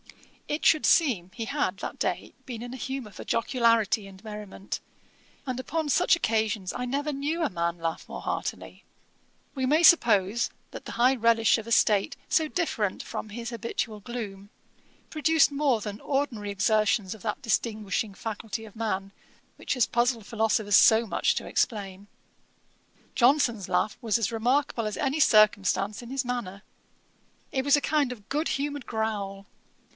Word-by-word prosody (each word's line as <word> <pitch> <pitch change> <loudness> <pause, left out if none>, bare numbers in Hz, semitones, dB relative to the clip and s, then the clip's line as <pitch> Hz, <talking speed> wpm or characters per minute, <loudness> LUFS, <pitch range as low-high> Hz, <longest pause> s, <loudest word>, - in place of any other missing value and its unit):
It 295 +2 -3
should 310 - +5
seem 220 - +3
he 230 - -4
had 275 -8 -1
that - - -6
day - - -2
been 235 -4 -6
in 245 +1 -7
a - - -6
humour 265 -4 -5
for - - -9
jocularity 230 -3 +2
and 190 -1 -14
merriment, 210 -2 -7 0.6
and 255 -2 -3
upon 320 +4 -2
such 345 +5 +4
occasions 220 - -1
I 250 - -4
never 285 +4 -2
knew 295 +5 -2
a - - +1
man 170 0 -1
laugh 165 -1 -4
more - - -6
heartily. - - -5 0.7
We 260 -1 -1
may 300 +5 +3
suppose, 230 - +5 0.2
that - - -8
the - - -8
high 250 +3 +4
relish 230 -2 +3
of 225 0 -7
a - - -6
state 210 +4 +3
so 315 -3 +2
different 225 - -1
from 215 - -6
his 235 +3 -6
habitual 230 -1 -4
gloom, 205 -4 -7 0.6
produced 315 -1 +3
more 280 -5 +1
than 205 0 -6
ordinary 270 -7 -2
exertions 210 0 +1
of 215 - -15
that 225 +5 -3
distinguishing 215 -4 -1
faculty 225 0 -5
of 215 - -14
man, 200 -3 -3 0.4
which - - -3
has 250 - +3
puzzled 240 -2 0
philosophers 220 -2 +1
so 225 +3 +6
much 215 - +1
to - - -3
explain. 200 -3 -2 1.1
Johnson's 240 -6 +3
laugh 215 - 0
was 225 -3 +1
as 225 -2 -1
remarkable 240 +1 +1
as 215 - -3
any 275 +3 -1
circumstance 210 -4 +3
in 240 - -10
his 265 0 -2
manner. 215 -6 -4 0.9
It 265 - 0
was 285 +1 +5
a - - -1
kind 290 -4 +1
of 215 -4 -10
good 300 +3 0
humoured 285 -1 -3
growl. 205 -3 -3
230 Hz, 160 wpm, -27 LUFS, 205-265 Hz, 1.1 s, so